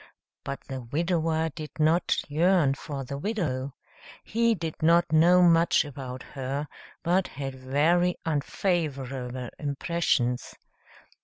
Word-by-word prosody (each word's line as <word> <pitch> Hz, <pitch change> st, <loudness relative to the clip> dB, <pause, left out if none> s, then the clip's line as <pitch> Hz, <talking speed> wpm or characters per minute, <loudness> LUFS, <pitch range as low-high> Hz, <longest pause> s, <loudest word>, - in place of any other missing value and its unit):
But 140 Hz, -, -5 dB
the 130 Hz, -1 st, -6 dB
widower 160 Hz, +4 st, 0 dB
did 155 Hz, 0 st, -7 dB
not 160 Hz, +3 st, +2 dB
yearn 165 Hz, -1 st, +3 dB
for 140 Hz, -1 st, -6 dB
the 140 Hz, +2 st, -6 dB
widow. 140 Hz, -, -2 dB, 0.5 s
He 230 Hz, +1 st, +2 dB
did 165 Hz, -4 st, -5 dB
not 170 Hz, +1 st, +4 dB
know 175 Hz, +3 st, +6 dB
much 165 Hz, -2 st, +4 dB
about 130 Hz, -2 st, -7 dB
her, 140 Hz, +2 st, -4 dB, 0.4 s
but 180 Hz, +2 st, +2 dB
had 135 Hz, -1 st, -6 dB
very 150 Hz, +7 st, +2 dB
unfavorable 135 Hz, -6 st, -2 dB
impressions. 140 Hz, -4 st, -1 dB
155 Hz, 110 wpm, -27 LUFS, 135-170 Hz, 0.5 s, know